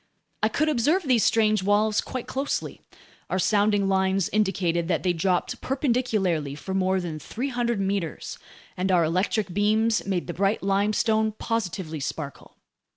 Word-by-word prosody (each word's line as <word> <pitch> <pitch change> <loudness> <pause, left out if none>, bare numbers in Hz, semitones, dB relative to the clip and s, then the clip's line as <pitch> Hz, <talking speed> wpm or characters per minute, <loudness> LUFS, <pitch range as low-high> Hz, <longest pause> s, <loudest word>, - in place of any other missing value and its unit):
I - - +3
could 310 - 0
observe 305 +6 +2
these 255 -6 +3
strange 215 -2 +3
walls 205 +2 +2
quite 255 -2 -5
closely: 275 +2 -3 0.5
our - - 0
sounding 205 +1 +2
lines 190 -1 +1
indicated 180 -5 0
that 170 -3 0
they 180 -2 +2
dropped 180 +1 -1
perpendicularly 225 - 0
for 190 +6 -6
more 190 0 +1
than 165 -4 -5
300 240 - -2
meters, 195 -4 -3 0.4
and 185 +1 -1
our 175 -2 +4
electric 185 +3 0
beams 215 +2 +2
made 185 -3 -1
the 175 - -5
bright 195 +4 0
limestone 215 +2 +1
positively 190 -8 -3
sparkle. 140 +1 -6
200 Hz, 145 wpm, -25 LUFS, 180-220 Hz, 0.5 s, our